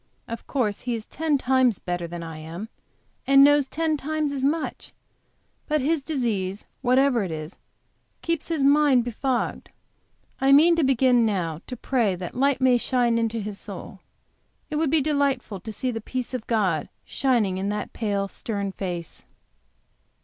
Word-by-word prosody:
Of 230 - -7
course, 220 -7 -1
he 245 -1 -2
is 220 -1 -6
ten 315 -2 0
times 260 -5 +2
better 175 -1 -4
than 170 0 -6
I 160 -1 -7
am, 170 +8 -7 0.6
and 275 0 +7
knows 290 -1 +5
ten 315 0 0
times 305 +1 -2
as 275 -2 -3
much, 305 +4 -2 0.7
but 305 0 +1
his 300 +3 +1
disease, 220 - -2 0.2
whatever 255 -1 +3
it 185 - -4
is, 155 +2 -7 0.6
keeps 335 -2 -1
his 320 -4 -1
mind 280 -3 +5
befogged. 245 +2 -2 0.7
I 270 +1 +4
mean 330 +4 +7
to 330 - +3
begin 255 -2 +4
now 175 -7 -1
to 250 - -6
pray 230 -7 +1
that 180 0 -6
light 275 +1 +2
may 255 -2 +4
shine 240 -2 +2
into 230 0 -1
his 210 -1 -6
soul. 195 -1 -9 0.7
It 300 - -1
would 315 -1 +1
be 315 +1 +3
delightful 280 -8 0
to 220 +4 -7
see 250 +4 -2
the 225 -1 -5
peace 255 +3 -4
of 250 -3 -4
God 190 -9 0 0.2
shining 230 -9 +1
in 195 +1 -1
that 210 0 -4
pale, 200 -3 -1
stern 200 -1 -4
face. 175 -4 -6
245 Hz, 165 wpm, -25 LUFS, 200-275 Hz, 0.7 s, and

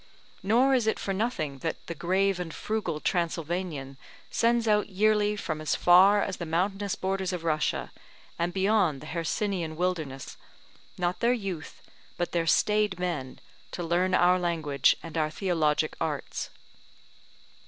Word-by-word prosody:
Nor 240 +7 +3
is 245 -4 +2
it 220 - +2
for 195 - -3
nothing 180 - -2
that 165 +4 -4
the - - -5
grave 190 +3 +1
and 175 -2 -4
frugal 190 -5 -3
Transylvanian 165 -5 -2 0.3
sends 235 0 +2
out 210 -1 +2
yearly 210 +1 +2
from 155 -6 -4
as 155 - 0
far 195 +3 +6
as 190 - -3
the 170 - -5
mountainous 195 +4 -1
borders 190 0 -2
of 180 -2 -4
Russia, 155 -2 -1 0.5
and 170 +1 0
beyond 190 -6 +2
the - - -10
Hercynian 170 +1 -2
wilderness, 160 -7 -3 0.6
not 180 0 -1
their 240 +1 +3
youth, 195 -9 -5 0.3
but 175 - -2
their 170 -1 0
staid 210 +1 +2
men, 165 -8 -3 0.3
to 175 - -5
learn 180 +2 +1
our 180 +1 +4
language 155 -6 +2
and 165 -1 -4
our 155 -1 +1
theologic 155 -3 0
arts. - - -3
180 Hz, 145 wpm, -28 LUFS, 160-200 Hz, 0.6 s, far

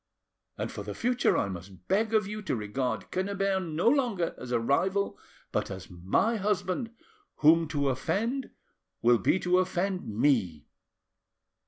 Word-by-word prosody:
And - - -3
for - - -6
the - - -6
future 245 +1 +2
I - - +1
must 90 -1 -9
beg 215 +3 +2
of 215 - +3
you 210 +2 -5
to 195 - -1
regard 110 +2 -3
Quennebert 195 0 0
no 160 +7 0
longer 235 - +2
as 125 - -7
a 120 - +2
rival 190 +11 +1 0.4
but - - -1
as 95 -1 -8
my 95 - +1
husband, 210 +2 -1 0.5
whom 165 +2 +5
to 145 -2 0
offend 225 - -1 0.5
will 120 0 +5
be 100 - +3
to 180 +1 +3
offend 185 +1 -1
me." 105 - +1
175 Hz, 150 wpm, -29 LUFS, -, 0.5 s, whom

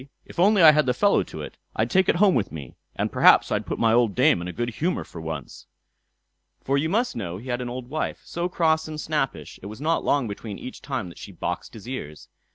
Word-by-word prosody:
"If - - -10
I - - +6
only 205 -3 +5
had 150 -2 +7
the 125 - +2
fellow 205 +6 +3
to - - -7
it, - - -9 0.2
I'd - - 0
take 190 -1 +3
it - - +4
home 190 +1 +5
with 105 -9 0
me, 70 -5 -8 0.2
and - - -1
perhaps - - +5
I'd - - -1
put - - -3
my 115 -1 +3
old 115 -4 +3
dame 130 - +4
in 90 - -5
a - - -4
good 120 +4 -3
humour 170 +10 -1
for 85 - -10
once." 80 -2 -7 0.9
For 135 - -1
you 150 +3 +1
must 230 +7 0
know 90 -6 -4
he 120 +6 -9
had 120 0 -1
an 125 - -4
old 125 0 -6
wife, 155 +4 -3
so 170 +1 -3
cross 160 -3 +1
and 155 -1 -6
snappish, 140 - -3
it 100 - -8
was 110 +3 -9
not 160 +3 0
long 140 -4 +1
between 100 0 -6
each 130 - -9
time 125 -9 -4
that 85 - -13
she - - -9
boxed 90 - -5
his 110 +1 -11
ears. 75 - -7
130 Hz, 250 wpm, -24 LUFS, 100-160 Hz, 0.9 s, had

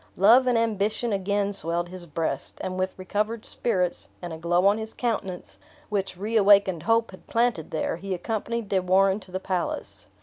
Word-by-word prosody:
Love 235 +7 +6
and 245 -2 +3
ambition 220 0 0
again 200 +1 0
swelled 170 -1 -1
his 180 -1 -9
breast; 160 +1 -3
and 185 -1 -3
with 185 0 -2
recovered 210 +4 -2
spirits, 180 -6 -1
and 175 -2 -6
a - - -6
glow 175 +2 +2
on 205 +2 +4
his 220 0 -6
countenance, 185 - -3 0.3
which 195 -3 -2
reawakened 200 -4 +4
hope 225 +4 +2
had 185 - -15
planted 230 -9 0
there, 160 0 -2
he 190 +1 -3
accompanied 225 +4 -3
De 195 - +2
Warenne 190 +2 +3
to 185 -2 -15
the 185 - -2
palace. 185 -2 -2
195 Hz, 175 wpm, -26 LUFS, 180-220 Hz, 0.3 s, Love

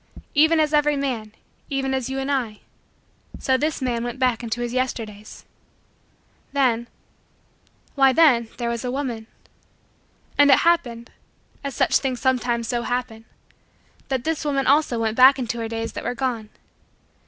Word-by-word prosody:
Even 315 +2 +4
as 305 -1 +1
every 295 0 +3
man, 245 -6 -3 0.4
even 270 -1 -1
as 260 -1 -2
you 265 - -3
and 270 +1 -2
I, 235 -6 -2 0.8
so 260 - +1
this 295 +1 -1
man 240 -2 -1
went 240 +1 -4
back 250 -3 +1
into 240 0 -3
his 240 0 -3
Yesterdays. 225 -5 -4 1.1
Then 240 -4 +1 1.1
why 270 -2 +5
then 255 -6 +4
there 240 - -3
was 235 0 -4
a 250 - -2
woman. 245 -4 -4 1.1
And 290 0 +7
it 270 - +6
happened 245 -9 +1 0.5
as 280 -3 -5
such - - +3
things 260 -3 -2
sometimes 245 -3 0
so 240 -1 -1
happen 240 -2 -4 0.8
that 265 -3 -2
this 320 -1 -2
woman 275 -2 0
also 280 -3 +3
went 220 -1 -1
back 260 +2 +8
into 235 -2 -3
her 225 - -3
days 225 0 -4
that - - -6
were 245 - -3
gone. 230 -4 -3
255 Hz, 155 wpm, -23 LUFS, 235-275 Hz, 1.1 s, back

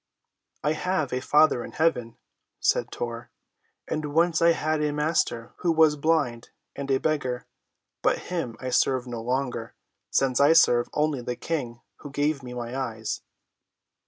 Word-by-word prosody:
"I 150 +2 +2
have 155 -5 -1
a 125 - 0
Father 150 -3 +4
in - - -9
heaven," 125 -8 0 0.4
said - - +1
Tor, 120 0 -5 0.6
"and 150 -1 -3
once 165 0 +3
I 170 0 +6
had 155 -1 -1
a 150 -1 +1
master 150 -6 -1
who 175 - +1
was 160 -2 +5
blind 145 -6 0 0.3
and 140 0 -5
a 135 - +4
beggar; 130 -6 -1 0.6
but - - +2
him 160 -11 -4
I 130 0 -4
serve 130 0 +2
no 120 -2 -5
longer, 125 -2 -2 0.3
since 130 -1 +2
I 145 +3 +6
serve 120 -7 +4
only 150 -3 +1
the 125 0 -3
King 125 -8 -4 0.2
who 145 - -9
gave 145 +1 0
me 125 -1 -8
my 120 0 -5
eyes." 115 -4 -3
140 Hz, 160 wpm, -26 LUFS, 125-155 Hz, 0.6 s, I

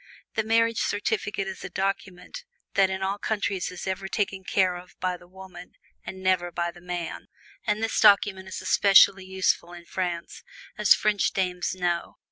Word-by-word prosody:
The 220 - +1
marriage 230 +1 +2
certificate 210 - -1
is 190 -1 -7
a - - -5
document 195 - -4 0.3
that 195 -1 +4
in 190 0 -3
all 195 +2 -1
countries 200 -4 -1
is 180 - -8
ever 190 +1 -3
taken 195 -2 -2
care 185 -1 +2
of 180 +1 -12
by 185 -1 -1
the 175 0 -16
woman 185 -1 -12 0.3
and 190 0 -8
never 180 -2 +1
by 170 0 -2
the 175 0 -16
man. 175 -2 -5 0.4
And 210 +1 0
this 225 - 0
document 200 -2 +4
is 190 - -6
especially 195 -1 +5
useful 185 -2 0
in 175 -1 -11
France, 175 -2 -4 0.3
as 210 -2 +5
French 210 -1 +1
dames 180 -1 -1
know. 175 -2 -2
190 Hz, 170 wpm, -26 LUFS, 180-200 Hz, 0.4 s, especially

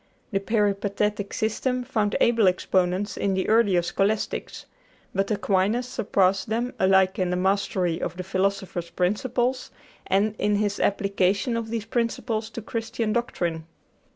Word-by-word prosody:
The 195 - +1
peripatetic 205 -1 0
system 250 +3 -1
found 215 -5 0
able 230 -4 +4
exponents 185 +2 +1
in 195 -1 0
the 190 - -1
earlier 205 -6 +4
Scholastics; 200 +4 -1 0.5
but 195 +1 0
Aquinas 210 +3 +1
surpassed 195 -5 +1
them 235 +3 -1
alike 190 0 +3
in 185 -1 +1
the 180 - 0
mastery 185 -2 0
of 175 - -3
the 185 - -4
philosopher's 190 -2 -1
principles 245 +8 -1 0.4
and 200 +3 +2
in 210 0 +2
his 205 -1 0
application 200 +3 +1
of 230 -1 -3
these 225 -2 -3
principles 230 -1 -2
to 230 0 -7
Christian 225 -1 -2
doctrine. 170 -9 -2
205 Hz, 135 wpm, -25 LUFS, 190-225 Hz, 0.5 s, able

